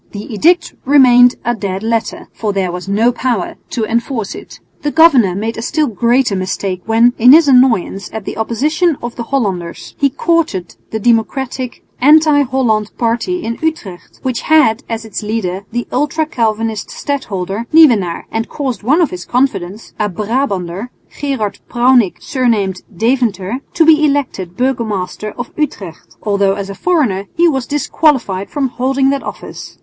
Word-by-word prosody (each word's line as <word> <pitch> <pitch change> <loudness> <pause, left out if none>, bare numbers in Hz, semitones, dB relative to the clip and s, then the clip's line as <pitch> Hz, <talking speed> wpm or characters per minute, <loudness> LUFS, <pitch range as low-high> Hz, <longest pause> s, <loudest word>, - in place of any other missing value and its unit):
The 205 +2 -7
edict 340 - +2
remained 250 -3 +6
a 240 - +1
dead 195 -3 -4
letter, 225 0 -2
for 215 -2 -2
there 190 -2 -1
was 180 +1 -7
no 220 +5 +3
power 245 -5 -2
to 225 -3 -2
enforce 230 -1 -2
it. - - -11 0.2
The 295 - -1
governor 280 - +5
made 225 +3 -3
a - - -4
still 305 +6 0
greater 240 -1 +1
mistake 185 0 -3
when, 230 +2 +4
in 250 +4 +8
his 320 0 +6
annoyance 250 -7 +3
at 220 -3 -6
the - - -5
opposition 300 +9 0
of 240 0 -5
the - - -5
Hollanders, 195 -11 -3
he 280 - +3
courted 275 - -1
the 220 - -3
democratic 245 +3 -1
anti 300 +1 +5
Holland 245 -6 0
party 240 +10 -1
in 230 0 -4
Utrecht, 265 - -4
which 255 -3 -2
had 285 -7 +3
as 225 -1 -4
its 220 - -5
leader 200 -3 -3
the 240 +1 -3
ultra 295 +4 0
Calvinist 225 -5 -2
stadholder, 220 -6 -4
Nieuwenaar, 235 - +4
and 225 0 -3
caused 260 -7 -3
one 280 +11 +2
of 330 - +1
his 180 0 -6
confidants, 215 -6 -2
a 210 -1 0
Brabanter, 200 -1 -2 0.3
Gerard 270 -8 -2
Prounick, 240 -5 +3
surnamed 215 -8 -1 0.2
Deventer, 230 -2 0 0.2
to 330 - +4
be 310 -1 +5
elected 270 - -1
burgomaster 220 -6 -2
of 245 - -6
Utrecht, 195 - -5
although 200 -2 +1
as 200 -1 -5
a - - -6
foreigner 220 - 0
he 345 +1 +4
was 265 -6 -1
disqualified 265 - 0
from 275 -3 -1
holding 270 +2 +1
that 280 -1 -1
office. - - -9
235 Hz, 160 wpm, -15 LUFS, 200-275 Hz, 0.3 s, in